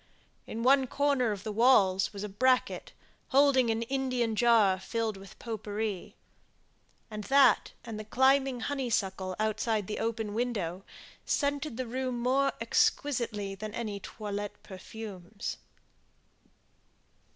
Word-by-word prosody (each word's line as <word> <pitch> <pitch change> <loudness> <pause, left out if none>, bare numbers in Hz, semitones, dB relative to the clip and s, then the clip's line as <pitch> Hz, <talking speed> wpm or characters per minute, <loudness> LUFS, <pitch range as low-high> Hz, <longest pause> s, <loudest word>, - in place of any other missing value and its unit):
In 230 +1 -4
one 265 +1 +5
corner 275 -4 +1
of 200 -2 -5
the 215 - -4
walls 205 -5 +4
was 205 -1 -7
a - - -3
bracket, 255 +6 +1 0.4
holding 270 -3 +4
an 225 +1 0
Indian 255 -3 -1
jar 215 -5 +4
filled 220 +2 -2
with 195 -1 -13
pot 225 -3 -5
pourri; 210 -2 -4 1.0
and 210 -1 -6
that 270 -4 +4
and 225 -2 -6
the - - -5
climbing 265 +2 +2
honeysuckle 195 -9 -2
outside 215 0 0
the 210 - -4
open 225 -2 -2
window 205 -6 -2 0.4
scented 285 -3 -1
the 255 - -2
room 255 +1 -3
more 270 +3 +2
exquisitely 230 -3 0
than 210 +2 -7
any 215 -4 -4
toilette 205 0 -6
perfumes. 200 0 -7
225 Hz, 125 wpm, -30 LUFS, 205-255 Hz, 1.0 s, one